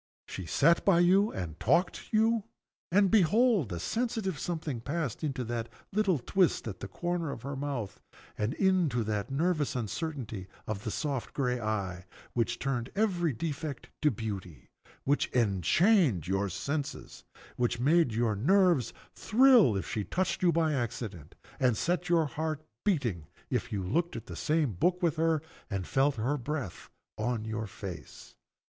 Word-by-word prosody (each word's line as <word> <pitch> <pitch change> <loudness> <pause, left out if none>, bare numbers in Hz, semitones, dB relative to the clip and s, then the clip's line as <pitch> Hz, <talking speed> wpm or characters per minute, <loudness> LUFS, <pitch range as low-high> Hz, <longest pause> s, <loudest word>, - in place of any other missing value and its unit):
She 95 -3 -6
sat 165 - +4
by 175 -3 +5
you 195 +4 +4
and 80 -4 -5
talked 175 +1 +3
to - - -9
you 225 0 +3 0.5
and 195 +1 +4
behold, 210 - +4
a 85 - -3
sensitive 220 - -2
something 155 -8 -3
passed 145 0 -3
into 135 -4 -2
that 115 0 -3 0.2
little 195 -5 +2
twist 175 +3 +1
at 100 -4 -6
the - - -5
corner 175 - -2
of 125 -4 -6
the 140 +1 -4
mouth, 135 -7 -4 0.3
and 110 +7 -1
into 175 -11 +2
that 105 -2 -2
nervous 150 +1 0
uncertainty 120 - -4 0.2
in 110 - -2
the 110 - -5
soft 140 +1 -3
gray 125 -3 0
eye, 95 -5 -2 0.3
which 120 0 0
turned 130 -3 -2 0.5
defect 150 -3 -4
into 150 - +5
beauty 100 - -6 0.3
which 145 +2 +2
enchained 120 - +3
your 95 +1 0
senses 140 - -4 0.3
which 120 -1 0
made 155 +1 +4
your 110 -1 +1
nerves 170 - +3 0.2
thrill 230 - +5
if 95 - -4
she 105 - -2
touched 185 - -1
you 180 -2 +4
by 160 -2 +2
accident, 110 - -4 0.2
and 125 -4 +3
set 175 +5 0
your 165 -2 +4
heart 155 +1 -3 0.2
beating 120 - 0 0.2
if - - -1
you 100 -2 -2
looked 170 - 0
at 115 - -6
the 85 - -8
same 150 - +1
book 180 - +1
with 165 -2 +2
her, 160 -1 +2 0.3
and 95 -2 -2
felt 135 - +2
her 125 +7 0
breath 135 - -5 0.3
on 110 0 -1
your 110 0 -3
face. 95 -2 -9
135 Hz, 155 wpm, -30 LUFS, 110-170 Hz, 0.5 s, by